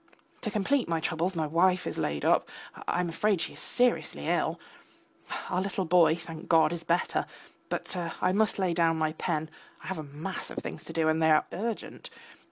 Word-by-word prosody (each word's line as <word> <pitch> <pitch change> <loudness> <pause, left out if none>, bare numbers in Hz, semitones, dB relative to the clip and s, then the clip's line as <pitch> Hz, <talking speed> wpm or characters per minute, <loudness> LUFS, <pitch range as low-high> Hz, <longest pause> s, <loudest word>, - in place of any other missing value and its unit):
To 220 - -2
complete 215 +3 +1
my 165 -1 +1
troubles, 170 +3 -1
my 160 -2 0
wife 180 +4 +3
is - - -3
laid 75 -1 -1
up; - - +3 0.4
I 175 - +1
am 175 - -1
afraid 195 +3 +1
she 165 - -2
is - - -11
seriously 250 0 0
ill. - - +1 0.9
Our 180 - +1
little 190 -1 -1
boy, 170 -1 +5
thank 165 -1 -9
God, 165 -1 +5
is 170 -1 -5
better; 170 +1 +1 0.4
but - - -3 0.2
I 185 - +2
must 210 +2 +2
lay 185 -3 +1
down 165 -1 +3
my 155 -1 0
pen, 155 0 -1 0.4
I - - -11
have 190 -3 -3
a - - -4
mass 150 +6 -5
of - - -9
things - - -5
to 165 - -7
do 160 -1 +2
and 160 +1 +2
they 160 - +5
are 155 -1 +5
urgent. 220 +4 -4
170 Hz, 200 wpm, -29 LUFS, 160-190 Hz, 0.9 s, boy